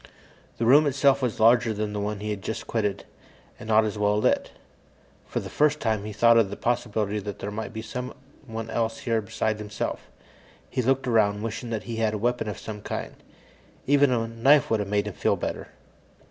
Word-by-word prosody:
The 115 Hz, -, -1 dB
room 145 Hz, +5 st, +6 dB
itself 140 Hz, 0 st, +3 dB
was 125 Hz, -4 st, -1 dB
larger 115 Hz, +1 st, +5 dB
than 105 Hz, 0 st, -3 dB
the 105 Hz, -, -2 dB
one 105 Hz, 0 st, -3 dB
he 105 Hz, 0 st, -3 dB
had 100 Hz, -2 st, -4 dB
just 110 Hz, -, -4 dB
quitted, 105 Hz, -3 st, -2 dB, 0.5 s
and 110 Hz, -, -9 dB
not 110 Hz, 0 st, +5 dB
as 105 Hz, -1 st, -3 dB
well 105 Hz, 0 st, +2 dB
lit. 105 Hz, -, +1 dB, 0.8 s
For -, -, -2 dB
the -, -, -7 dB
first 150 Hz, 0 st, +2 dB
time, 110 Hz, -2 st, -1 dB
he 105 Hz, -, -5 dB
thought 115 Hz, +2 st, +5 dB
of 105 Hz, -4 st, +2 dB
the 100 Hz, -, -5 dB
possibility 110 Hz, -4 st, -1 dB
that 105 Hz, 0 st, -6 dB
there 100 Hz, -, -5 dB
might 110 Hz, +2 st, -5 dB
be 110 Hz, -1 st, -6 dB
someone 125 Hz, -1 st, -7 dB
else 115 Hz, +1 st, -1 dB
here 115 Hz, -5 st, 0 dB
besides 110 Hz, 0 st, -2 dB
himself. 105 Hz, 0 st, -4 dB, 0.6 s
He 130 Hz, -, 0 dB
looked 135 Hz, +2 st, +1 dB
around, 105 Hz, -3 st, +2 dB
wishing 115 Hz, +1 st, -4 dB
that 110 Hz, -2 st, -3 dB
he 115 Hz, -2 st, -5 dB
had 110 Hz, -1 st, +1 dB
a -, -, -1 dB
weapon 120 Hz, +1 st, -1 dB
of 105 Hz, -, -5 dB
some 105 Hz, -1 st, -7 dB
kind. -, -, -5 dB, 0.7 s
Even 145 Hz, 0 st, +4 dB
a 115 Hz, -2 st, 0 dB
knife 120 Hz, +5 st, +3 dB
would 110 Hz, -, +3 dB
have 100 Hz, -1 st, -3 dB
made 105 Hz, 0 st, +1 dB
him 105 Hz, -, -5 dB
feel -, -, +1 dB
better. -, -, -4 dB
110 Hz, 205 wpm, -26 LUFS, 105-120 Hz, 0.8 s, room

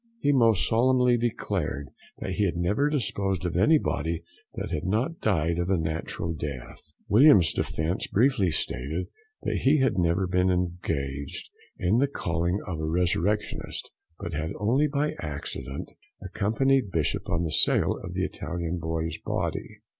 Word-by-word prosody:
He 145 Hz, -, +2 dB
most 115 Hz, -, +4 dB
solemnly 125 Hz, +1 st, +4 dB
declared 100 Hz, -, -2 dB, 0.3 s
that 95 Hz, -, -4 dB
he 100 Hz, +3 st, +1 dB
had 85 Hz, -3 st, -1 dB
never 105 Hz, +12 st, +1 dB
disposed 95 Hz, -, -1 dB
of 85 Hz, -, -2 dB
any 150 Hz, -, +5 dB
body 85 Hz, -, -2 dB, 0.3 s
that -, -, -4 dB
had 75 Hz, -, -2 dB
not 110 Hz, -, -1 dB
died 85 Hz, -5 st, +1 dB
a 90 Hz, +2 st, +1 dB
natural 80 Hz, +1 st, -3 dB
death. 70 Hz, -5 st, -7 dB, 0.2 s
Williams' 110 Hz, -, +6 dB
defence 80 Hz, +4 st, -1 dB
briefly 115 Hz, -4 st, +3 dB
stated 80 Hz, +2 st, -2 dB, 0.3 s
that -, -, 0 dB
he 140 Hz, +3 st, +4 dB
had 130 Hz, -8 st, +2 dB
never 85 Hz, +2 st, +2 dB
been 90 Hz, 0 st, +2 dB
engaged 80 Hz, -6 st, -2 dB, 0.3 s
in 95 Hz, +6 st, +2 dB
the 140 Hz, -, +3 dB
calling 85 Hz, -, -1 dB
of 85 Hz, -5 st, -4 dB
a -, -, -3 dB
resurrectionist, 90 Hz, +5 st, -1 dB, 0.3 s
but 85 Hz, -4 st, -6 dB
had 80 Hz, +1 st, -2 dB
only 130 Hz, +8 st, +2 dB
by 150 Hz, +1 st, 0 dB
accident 70 Hz, -2 st, -5 dB, 0.3 s
accompanied 110 Hz, +5 st, +1 dB
Bishop 80 Hz, -4 st, -1 dB
on 85 Hz, 0 st, 0 dB
the 80 Hz, -, -2 dB
sale -, -, +3 dB
of -, -, -6 dB
the -, -, 0 dB
Italian 85 Hz, 0 st, -3 dB
boy's 80 Hz, 0 st, -3 dB
body. 110 Hz, 0 st, -3 dB
90 Hz, 150 wpm, -27 LUFS, 80-115 Hz, 0.3 s, Williams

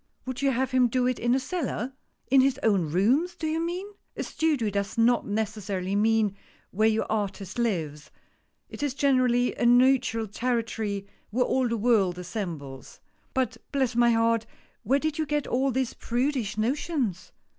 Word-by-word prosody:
Would 260 Hz, 0 st, -5 dB
you 275 Hz, -, +3 dB
have 260 Hz, 0 st, 0 dB
him 255 Hz, -1 st, +4 dB
do 250 Hz, +1 st, 0 dB
it 255 Hz, -1 st, 0 dB
in 240 Hz, +1 st, +2 dB
a -, -, +2 dB
cellar? 270 Hz, -, -3 dB, 0.2 s
" -, -, -41 dB
"In 270 Hz, -1 st, +7 dB
his 270 Hz, 0 st, +1 dB
own 190 Hz, -8 st, +2 dB
rooms, 260 Hz, -, +2 dB
do 330 Hz, -, -5 dB
you 315 Hz, +1 st, 0 dB
mean? 350 Hz, +3 st, -3 dB, 0.2 s
" -, -, -33 dB
"A -, -, -2 dB
studio 290 Hz, -10 st, 0 dB
does 200 Hz, +2 st, -3 dB
not 235 Hz, +1 st, +3 dB
necessarily 205 Hz, -3 st, -2 dB
mean 215 Hz, -1 st, +2 dB, 0.4 s
where 215 Hz, +3 st, +3 dB
your 220 Hz, 0 st, 0 dB
artist 205 Hz, -1 st, -3 dB
lives; 160 Hz, -10 st, -2 dB, 0.6 s
it -, -, -9 dB
is 285 Hz, -2 st, -1 dB
generally 255 Hz, -3 st, +2 dB
a -, -, -4 dB
neutral 245 Hz, -2 st, +4 dB
territory 225 Hz, -2 st, -2 dB, 0.2 s
where 250 Hz, +3 st, +1 dB
all 260 Hz, -1 st, +1 dB
the 230 Hz, 0 st, -1 dB
world 205 Hz, -6 st, +2 dB
assembles. 170 Hz, -, -6 dB, 0.4 s
But 260 Hz, -1 st, 0 dB
bless 265 Hz, -4 st, 0 dB
my 240 Hz, 0 st, +5 dB
heart, 230 Hz, -1 st, +2 dB, 0.3 s
where 270 Hz, -, +2 dB
did 310 Hz, +1 st, -2 dB
you 310 Hz, -, 0 dB
get 295 Hz, -1 st, 0 dB
all 265 Hz, +2 st, +1 dB
these 260 Hz, -1 st, -1 dB
prudish 240 Hz, -3 st, -1 dB
notions 235 Hz, -, -1 dB
235 Hz, 175 wpm, -27 LUFS, 210-265 Hz, 0.6 s, In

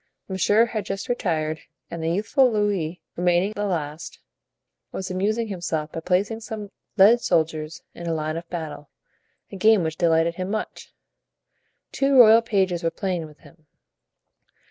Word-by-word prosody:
Monsieur 205 Hz, +4 st, +3 dB
had 220 Hz, -3 st, -4 dB
just 195 Hz, 0 st, -4 dB
retired, 160 Hz, -9 st, -1 dB, 0.3 s
and 170 Hz, -1 st, -5 dB
the 160 Hz, -, -1 dB
youthful 225 Hz, -, +2 dB
Louis, 200 Hz, -6 st, -1 dB, 0.2 s
remaining 175 Hz, +3 st, +2 dB
the 205 Hz, -, -2 dB
last, 165 Hz, -2 st, -4 dB, 0.7 s
was 190 Hz, -1 st, -5 dB
amusing 215 Hz, +5 st, -1 dB
himself 170 Hz, -5 st, -3 dB
by -, -, -5 dB
placing 190 Hz, +6 st, 0 dB
some 215 Hz, -3 st, -7 dB, 0.3 s
lead 220 Hz, +5 st, +6 dB
soldiers 155 Hz, -3 st, -1 dB
in 170 Hz, -, -8 dB
a 165 Hz, -, 0 dB
line 155 Hz, 0 st, -2 dB
of 170 Hz, +1 st, -7 dB
battle, 155 Hz, -4 st, -6 dB, 0.6 s
a 195 Hz, -, -7 dB
game 215 Hz, -1 st, +4 dB
which 160 Hz, 0 st, -3 dB
delighted 165 Hz, -1 st, +2 dB
him 185 Hz, 0 st, -3 dB
much. 215 Hz, +1 st, -5 dB, 1.0 s
Two 275 Hz, 0 st, +2 dB
royal 225 Hz, -2 st, +8 dB
pages 190 Hz, -6 st, 0 dB
were 165 Hz, -, +1 dB
playing 175 Hz, -2 st, -3 dB
with 150 Hz, 0 st, -17 dB
him. 155 Hz, -2 st, -20 dB
180 Hz, 150 wpm, -24 LUFS, 165-210 Hz, 1.0 s, royal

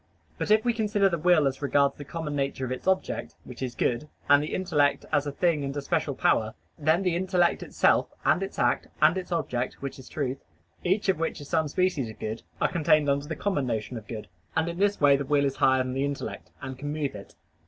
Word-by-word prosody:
But -, -, -2 dB
if 215 Hz, +1 st, +4 dB
we 240 Hz, -, +3 dB
consider 210 Hz, -3 st, +2 dB
the 170 Hz, -2 st, -2 dB
will 170 Hz, -2 st, +4 dB
as 135 Hz, 0 st, -1 dB
regards 140 Hz, -1 st, +3 dB
the 145 Hz, -, -8 dB
common 150 Hz, 0 st, -5 dB
nature 135 Hz, -1 st, -1 dB
of 125 Hz, -, -5 dB
its 130 Hz, -, -5 dB
object, 190 Hz, 0 st, 0 dB
which 125 Hz, 0 st, -11 dB
is 125 Hz, -2 st, -3 dB
good, 125 Hz, +5 st, 0 dB, 0.2 s
and 145 Hz, 0 st, +6 dB
the 150 Hz, -, -3 dB
intellect 150 Hz, -6 st, +1 dB
as 145 Hz, 0 st, +2 dB
a -, -, -2 dB
thing 155 Hz, 0 st, +1 dB
and 140 Hz, +1 st, -3 dB
a -, -, -1 dB
special -, -, -1 dB
power; -, -, +1 dB, 0.2 s
then 155 Hz, +5 st, +2 dB
the 180 Hz, -3 st, +1 dB
intellect 180 Hz, -1 st, +2 dB
itself, -, -, +2 dB, 0.2 s
and -, -, +3 dB
its 195 Hz, -, -5 dB
act, -, -, +1 dB
and 155 Hz, +3 st, +5 dB
its 185 Hz, -1 st, -5 dB
object, 125 Hz, -7 st, -1 dB
which 140 Hz, -1 st, -7 dB
is 130 Hz, -, -12 dB
truth, 135 Hz, -2 st, -2 dB, 0.4 s
each 190 Hz, +4 st, +1 dB
of 190 Hz, -4 st, +2 dB
which 165 Hz, -, -2 dB
is 145 Hz, -, -10 dB
some 160 Hz, -2 st, +1 dB
species 160 Hz, -6 st, 0 dB
of 110 Hz, -, -10 dB
good, 110 Hz, +2 st, -4 dB, 0.2 s
are -, -, +1 dB
contained 155 Hz, -4 st, +3 dB
under 140 Hz, +1 st, -1 dB
the 160 Hz, -, -3 dB
common 165 Hz, -10 st, -1 dB
notion 115 Hz, +1 st, -3 dB
of 110 Hz, -2 st, -8 dB
good. 110 Hz, -2 st, -6 dB, 0.3 s
And 160 Hz, +1 st, +1 dB
in 170 Hz, +1 st, -4 dB
this 205 Hz, 0 st, +2 dB
way 140 Hz, -1 st, +6 dB
the 140 Hz, -, -2 dB
will 140 Hz, +1 st, +2 dB
is 135 Hz, -1 st, -1 dB
higher 130 Hz, -1 st, +4 dB
than 130 Hz, 0 st, -4 dB
the 135 Hz, +1 st, 0 dB
intellect, 140 Hz, -1 st, -5 dB
and 130 Hz, -1 st, -6 dB
can 145 Hz, +1 st, -4 dB
move 150 Hz, -3 st, -2 dB
it. 100 Hz, -1 st, -11 dB
145 Hz, 240 wpm, -27 LUFS, 135-175 Hz, 0.4 s, and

